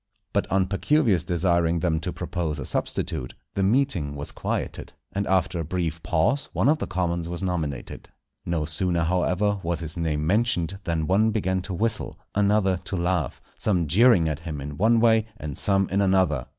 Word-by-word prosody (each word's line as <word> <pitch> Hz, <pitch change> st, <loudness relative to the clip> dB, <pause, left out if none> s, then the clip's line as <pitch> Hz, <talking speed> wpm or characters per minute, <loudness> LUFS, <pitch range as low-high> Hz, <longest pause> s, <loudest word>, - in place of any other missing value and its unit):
But -, -, 0 dB
on 95 Hz, -1 st, +3 dB
Pacuvius 100 Hz, -, +2 dB
desiring 85 Hz, -1 st, +1 dB
them 80 Hz, -2 st, +1 dB
to 80 Hz, -, -3 dB
propose 85 Hz, -4 st, -3 dB
a 70 Hz, -, -5 dB
substitute, -, -, -2 dB, 0.2 s
the 100 Hz, -, -1 dB
meeting 95 Hz, -, +1 dB
was 70 Hz, 0 st, -5 dB
quieted, -, -, -4 dB, 0.2 s
and 100 Hz, 0 st, -1 dB
after 95 Hz, -2 st, +1 dB
a -, -, -1 dB
brief 85 Hz, 0 st, -2 dB
pause 90 Hz, -, +1 dB
one -, -, +2 dB
of 155 Hz, +2 st, +4 dB
the -, -, -3 dB
commons 85 Hz, -2 st, -1 dB
was 85 Hz, +2 st, -4 dB
nominated. 80 Hz, -8 st, -3 dB, 0.3 s
No 85 Hz, -3 st, -1 dB
sooner, 85 Hz, +2 st, +1 dB
however, 90 Hz, +4 st, +1 dB
was 85 Hz, -1 st, -2 dB
his 80 Hz, 0 st, -5 dB
name 75 Hz, -3 st, -1 dB
mentioned 95 Hz, -2 st, +1 dB
than 85 Hz, -3 st, 0 dB
one 100 Hz, +6 st, +3 dB
began 95 Hz, -4 st, 0 dB
to 95 Hz, 0 st, -5 dB
whistle, 110 Hz, +2 st, -2 dB, 0.2 s
another 100 Hz, -2 st, +2 dB
to 95 Hz, -, -5 dB
laugh, 85 Hz, -5 st, -1 dB, 0.2 s
some 90 Hz, -5 st, +1 dB
jeering 95 Hz, -, +5 dB
at 75 Hz, -1 st, -2 dB
him 80 Hz, -3 st, -6 dB
in 70 Hz, +1 st, -6 dB
one 115 Hz, +7 st, +3 dB
way 110 Hz, -1 st, +4 dB
and 75 Hz, -9 st, -6 dB
some 95 Hz, -1 st, +2 dB
in 100 Hz, +2 st, +1 dB
another. 95 Hz, -9 st, +2 dB
90 Hz, 180 wpm, -25 LUFS, 80-100 Hz, 0.3 s, jeering